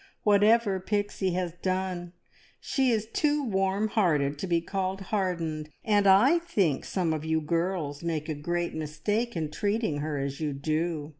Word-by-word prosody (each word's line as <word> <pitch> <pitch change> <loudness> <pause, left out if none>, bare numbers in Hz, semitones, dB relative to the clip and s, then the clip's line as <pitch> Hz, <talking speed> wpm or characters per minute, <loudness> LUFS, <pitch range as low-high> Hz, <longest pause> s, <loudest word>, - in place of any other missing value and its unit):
"Whatever 210 -1 +4
Pixie 205 -1 -1
has 180 -2 -2
done, 185 -2 -2 0.5
she 265 -3 +1
is 220 -2 +1
too 295 +5 0
warm 195 0 +1
hearted 150 -9 +1
to 190 - -3
be 170 -1 +2
called 190 +2 -2
`hardened,' 175 -6 -2 0.2
and 205 -2 +3
I 240 - +6
think 195 - 0
some 175 -4 0
of 155 -1 -3
you 160 0 +1
girls 165 -2 -2
make 160 -2 -2
a 155 - -1
great 170 +4 -2
mistake 170 +10 -2
in 155 -3 -2
treating 205 -4 -1
her 150 0 -2
as 140 +1 -3
you 150 -2 -1
do. 155 +2 -2
180 Hz, 160 wpm, -28 LUFS, 155-205 Hz, 0.5 s, I